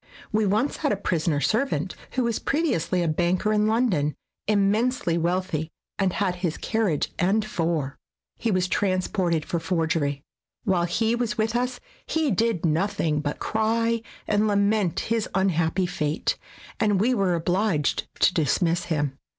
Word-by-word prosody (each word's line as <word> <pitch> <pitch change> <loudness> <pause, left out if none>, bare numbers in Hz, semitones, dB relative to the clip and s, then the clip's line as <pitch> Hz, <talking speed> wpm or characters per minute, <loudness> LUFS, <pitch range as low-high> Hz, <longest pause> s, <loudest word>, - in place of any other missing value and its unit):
We 215 -1 +2
once 215 +8 +1
had - - 0
a 205 - +1
prisoner 165 -6 0
servant 185 - 0 0.2
who 255 - +1
was 235 -2 0
previously 235 - 0
a - - 0
banker 175 +6 +1
in 210 0 +3
London, 210 - +1 0.3
immensely 210 -1 +2
wealthy, 170 -2 -1 0.3
and 190 -2 +2
had 185 -3 0
his 175 -3 -2
carriage 210 -9 0
and 200 +4 +2
four. 165 -8 -2 0.4
He 230 - 0
was 185 -3 +1
transported 185 -4 0
for 170 - -1
forgery. 160 -4 -1 0.4
While 180 -3 +2
he 220 +6 +1
was 240 -2 -1
with 220 +1 0
us 250 +1 -1 0.3
he 315 -4 +1
did 220 -3 +1
nothing 160 -2 +1
but 145 -1 -3
cry 230 +1 0 0.3
and 210 +1 +2
lament 200 -2 +2
his 225 -1 -1
unhappy 185 -1 +2
fate, 150 -3 -1 0.4
and 205 -3 +2
we 240 +6 +3
were 195 -6 +2
obliged 175 -2 0
to - - +5
dismiss 170 +2 +1
him. 145 -5 -1
185 Hz, 150 wpm, -25 LUFS, 165-220 Hz, 0.4 s, to